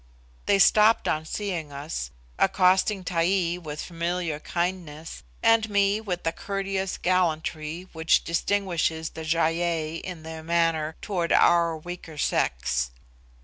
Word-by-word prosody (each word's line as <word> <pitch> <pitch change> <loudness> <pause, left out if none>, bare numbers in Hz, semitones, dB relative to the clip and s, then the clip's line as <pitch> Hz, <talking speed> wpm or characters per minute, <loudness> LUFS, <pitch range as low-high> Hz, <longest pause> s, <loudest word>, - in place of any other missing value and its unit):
They 200 - +4
stopped 215 +3 +5
on 155 0 0
seeing 175 -5 -4
us, 140 - -5 0.3
accosting 190 +1 +3
Taee 175 0 +1
with 150 -3 -6
familiar 170 -2 -2
kindness, 170 - -4 0.2
and 225 -1 +4
me 200 +1 +2
with 180 -5 -4
the 165 - +1
courteous 195 +1 -3
gallantry 165 -1 -1
which 160 0 +2
distinguishes 170 -3 0
the 160 - -7
Gy 165 +1 +1
ei 165 -2 -1
in 175 -2 -7
their 160 0 -7
manner 165 -1 +1
towards 175 -5 0
our 170 -1 +4
weaker 165 -1 -9
sex. - - 0
170 Hz, 125 wpm, -26 LUFS, 160-185 Hz, 0.3 s, stopped